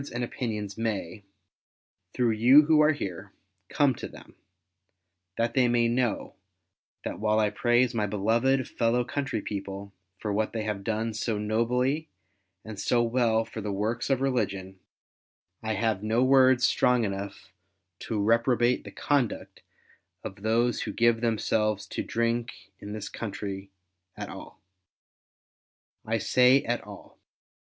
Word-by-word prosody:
nd 120 - -2
opinions 110 -5 -4
may, 105 -4 -3 0.9
through 120 -2 +2
you 125 +7 +7
who 155 0 +4
are 150 +1 +5
here, 95 - -5 0.4
come 140 -3 +3
to - - -7
them; - - -14 1.0
that 115 0 0
they 130 -2 +3
may 120 -1 +2
know, 120 -1 -1 0.7
that - - -5
while 110 0 +1
I 105 -1 +2
praise 120 +3 +2
my 105 -3 0
beloved 115 +6 +1
fellow 120 +1 +1
country 130 -3 -3
people 100 0 -6 0.2
for 105 +1 -3
what 110 +1 -1
they 110 -2 -2
have 105 -2 -3
done 110 +1 -2
so 110 0 -2
nobly 125 +8 0 0.6
and 110 -2 -8
so 120 -1 +2
well 115 -2 +1
for 110 0 -7
the 105 - -4
^vorks 110 +6 -2
of 135 -1 +1
religion, 100 -8 -2 0.8
I 110 -1 -2
have 110 -1 0
no 110 +3 +1
words 130 -1 +5
strong 125 -1 +3
enough 100 -1 -5 0.5
to 110 -3 -3
reprobate 120 +3 +2
the - - -9
conduct 140 -6 -1 0.6
of 95 +1 -8
those 115 +3 +1
who - - -4
give 115 -1 +3
themselves 110 -2 0
to - - -3
drink 115 -2 -2
in 105 +1 -7
this 105 -1 -5
country, 100 -2 -6 0.5
at - - -6
all. - - -11 1.4
I 115 +1 -1
say, 125 +4 +4
at 120 +1 -1
all. 100 0 -13
115 Hz, 140 wpm, -27 LUFS, 105-125 Hz, 1.4 s, you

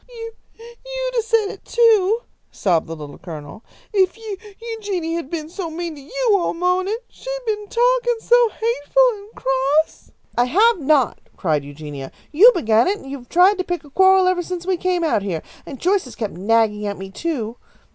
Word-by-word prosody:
"You 455 -2 -8 0.3
you'd - - -6
have 470 -2 +1
said 450 -2 +1
it, - - -10
too!" 450 -2 +3 0.3
sobbed 175 -6 0
the 165 - -5
Little 150 -2 -10
Colonel, 160 - -9 0.3
"if 380 0 +2
Eu 440 -3 -6 0.2
Eugenia 405 -8 -3
had 330 -5 -5
been 315 -2 -4
so 340 +1 -5
mean 335 +1 -4
to 290 - -11
you - - -1
all 355 -3 0
mawnin'! 365 +4 +1
She's - - -6
been 420 -2 -2
t - - -13
talkin 485 -1 +2
so 480 0 +4
hateful 470 +3 +2
and 410 +3 -16
cross 270 +4 0
" - - -33
"I 245 - +5
have 415 - +3
not!" 280 -4 +2 0.2
cried 155 -6 0
Eugenia. 145 -1 -8 0.2
"You 410 +11 +8
began 225 -7 +3
it, 400 +2 +1
and 270 -8 -10
you 280 - -5
have 245 - -17
tried 370 +3 +5
to - - +1
pick 355 -2 -3
a 290 - -16
quarrel 380 +2 +5
ever 365 -1 +2
since 355 0 -5
we 375 0 +1
came 360 -1 0
out 305 -10 +2
here, 180 -5 -3 0.2
and 275 -4 -8
Joyce 380 0 +1
has 245 -4 -11
kept 215 -3 -4
nagging 210 +2 +1
at 200 - -3
me, 195 0 -8
too. 245 - -3
355 Hz, 200 wpm, -21 LUFS, -, 0.3 s, You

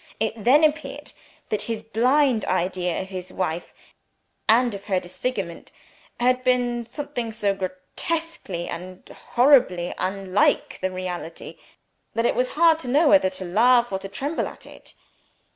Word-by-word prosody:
It 220 - 0
then 280 +7 +5
appeared 310 0 0 0.4
that 210 -1 -1
his 225 -1 -3
blind 250 +2 +2
idea 180 0 -1
of 190 - -12
his 185 -1 -7
wife, 175 -2 -3 0.8
and 235 +1 +4
of 200 0 -8
her 190 -3 +1
disfigurement 180 -1 -5 0.5
had 250 +1 +2
been 245 -2 +1
something 245 -3 -4
so 210 -3 0
grotesquely 190 - -4
and 185 +1 -8 0.3
horribly 240 -10 +4
unlike 195 +1 +1
the 185 - -1
reality, 180 -2 -6 0.6
that 230 +1 +1
it - - +3
was 250 +1 -1
hard 325 0 +4
to 290 - -6
know 290 +5 +4
whether 285 -11 +5
to 185 0 -6
laugh 240 +6 +4
or 190 - -1
to 195 - -8
tremble 285 +10 -2
at - - -12
it. - - -15
220 Hz, 145 wpm, -24 LUFS, 185-255 Hz, 0.8 s, then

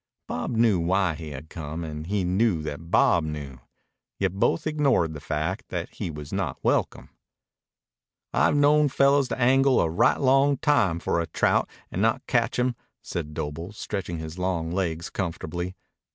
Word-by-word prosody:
Bob 80 +8 -3
knew 110 -5 +4
why 90 +1 +1
he 80 0 -8
had 75 +1 -8
come, 80 +1 -6
and 75 0 -6
he 100 0 0
knew 90 -2 +1
that 75 +2 -6
Bob 85 -1 +4
knew. 75 -4 -6 0.6
Yet 95 -2 0
both 95 -4 +1
ignored 140 - +2
the 75 - -7
fact 80 +10 -3
that 90 -2 -4
he 100 - -4
was 75 -2 -8
not - - -2
welcome. - - 0 1.2
"I've - - +3
known 145 +1 +4
fellows 140 0 +3
angle 135 +1 +4
a - - +3
right 85 - +3
long 135 +1 +4
time 120 - +2
for 85 0 0
a 85 - -3
trout - - +1 0.2
and - - -2
not - - +1
catch - - +1
him," 125 0 +1 0.3
said 75 -4 -5
Doble, 80 +5 -5
stretching 95 -5 -4
his 80 +2 -7
long 85 -3 -1
legs 85 -3 -2
comfortably. 90 0 -4
90 Hz, 165 wpm, -26 LUFS, 80-120 Hz, 1.2 s, knew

